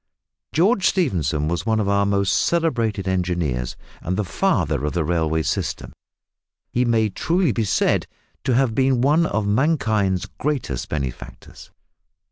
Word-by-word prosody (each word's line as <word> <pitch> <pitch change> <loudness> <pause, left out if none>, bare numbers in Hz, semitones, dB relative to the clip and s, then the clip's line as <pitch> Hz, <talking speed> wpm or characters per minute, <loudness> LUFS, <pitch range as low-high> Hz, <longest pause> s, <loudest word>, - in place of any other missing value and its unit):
George 195 +4 +3
Stephenson 85 - 0
was 85 +1 -1
one 110 -1 +2
of 105 - 0
our 100 0 +2
most 100 -1 +1
celebrated 115 - 0
engineers, 85 -10 -1 0.3
and 90 +2 -2
the 105 - +1
"father 85 - 0
of 75 - -1
the 85 - 0
railway 80 -1 0
system." 70 - -3 0.8
He 125 +1 +1
may 115 -2 +2
truly 170 - +1
be 110 +1 -1
said - - +1 0.4
to 125 - +2
have 130 -3 +2
been 130 0 +2
one 155 +5 +3
of 105 0 -1
mankind's 110 - +1
greatest 135 - -2
benefactors. 70 -5 -6
105 Hz, 140 wpm, -22 LUFS, 85-130 Hz, 0.8 s, George